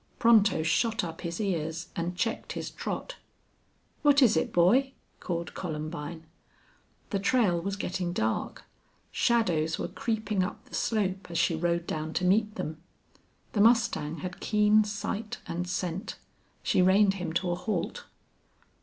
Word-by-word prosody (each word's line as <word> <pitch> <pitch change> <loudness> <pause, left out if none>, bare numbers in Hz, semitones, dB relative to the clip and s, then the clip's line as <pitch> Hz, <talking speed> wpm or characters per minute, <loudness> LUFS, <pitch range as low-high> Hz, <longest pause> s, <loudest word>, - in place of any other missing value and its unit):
Pronto 215 -8 +5
shot 225 +7 +1
up 165 -2 -6
his 170 -1 -4
ears 165 -4 -2
and 175 +1 -3
checked 225 +3 -2
his - - -5
trot. - - -5 0.8
"What 290 -2 +5
is 230 - +5
it, 160 - 0
boy?" 245 +11 +4 0.3
called 170 -2 -4
Columbine. 155 -1 -5 0.9
The 200 - 0
trail 200 -5 +2
was 195 +2 -2
getting 180 -2 -2
dark. 110 -10 -2 0.5
Shadows 170 -9 +1
were - - -2
creeping 210 +2 -1
up 210 +5 -4
the 255 - -20
slope 195 -4 -1
as 170 - -3
she 165 - +2
rode 170 +1 0
down 155 0 -3
to 180 - +1
meet 210 +3 +2
them. 155 -7 -5 0.7
The 205 - +2
mustang 215 -9 +3
had 185 0 -6
keen 210 0 +4
sight 210 +1 -4
and 175 +1 -3
scent. 180 +2 -3 0.5
She - - +3
reined 195 +2 +5
him 175 - -3
to 175 +1 0
a - - 0
halt. 210 +4 -3
185 Hz, 145 wpm, -28 LUFS, 170-215 Hz, 0.9 s, Pronto